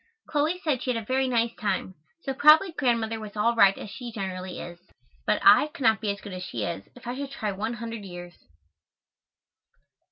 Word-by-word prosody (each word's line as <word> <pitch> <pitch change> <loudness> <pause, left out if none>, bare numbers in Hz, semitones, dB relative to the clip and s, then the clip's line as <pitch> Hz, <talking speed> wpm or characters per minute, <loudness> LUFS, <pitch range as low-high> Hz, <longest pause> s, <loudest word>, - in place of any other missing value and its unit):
Chloe 310 +4 0
said 285 -6 0
she 255 - -1
had 230 - -1
a 220 - -9
very 260 +3 +1
nice 235 -2 +1
time, 195 -3 -2 0.3
so 270 - -2
probably 305 +7 +6
Grandmother 230 -6 0
was 215 -1 -9
all 230 +3 +3
right 195 -3 +6
as 205 - -8
she 235 +5 -7
generally 185 -3 -5
is, 175 0 -8 0.5
but - - +2
I - - +8
could 290 -3 -9
not 220 -2 +4
be 215 - -1
as 200 0 -3
good 200 - -8
as 185 - -6
she 120 -11 -4
is, 95 -1 -5
if 250 - -15
I 245 +1 -3
should 280 +1 -5
try 215 -6 -3
one 215 +4 -3
hundred 230 -2 -6
years. 175 -2 -9
225 Hz, 210 wpm, -26 LUFS, 195-255 Hz, 0.5 s, I